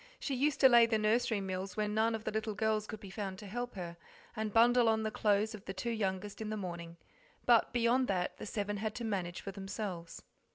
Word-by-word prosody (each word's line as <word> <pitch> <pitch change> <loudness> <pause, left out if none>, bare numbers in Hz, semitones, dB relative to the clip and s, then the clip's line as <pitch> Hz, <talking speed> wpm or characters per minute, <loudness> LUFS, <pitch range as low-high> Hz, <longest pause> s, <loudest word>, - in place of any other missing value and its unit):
She 280 - -2
used 275 +2 +1
to 265 - +10
lay 235 -2 +7
the 225 -1 +2
nursery 215 0 +2
meals 190 +1 -4
when 210 -1 0
none 225 +1 +2
of 220 - -6
the - - -2
little 220 0 -2
girls 215 0 0
could 220 - -6
be 195 -2 -10
found 195 -2 -4
to 210 - -10
help 245 +4 -4
her, 170 -2 -6 0.4
and 215 -1 -2
bundle 235 +1 +5
on 220 0 +2
the 215 - -1
clothes 210 +1 +2
of 210 -2 -10
the 190 - -5
two 210 +6 -2
youngest 205 -1 -2
in 215 - -3
the 215 - -2
morning, 170 -3 -6 0.5
but 235 -2 +5
beyond 245 +2 +2
that 180 -2 -1
the - - -7
seven 205 0 -2
had 215 +1 -3
to 240 - -4
manage 185 -5 -2
for 195 - -5
themselves. 195 -3 -6
215 Hz, 235 wpm, -33 LUFS, 195-225 Hz, 0.5 s, to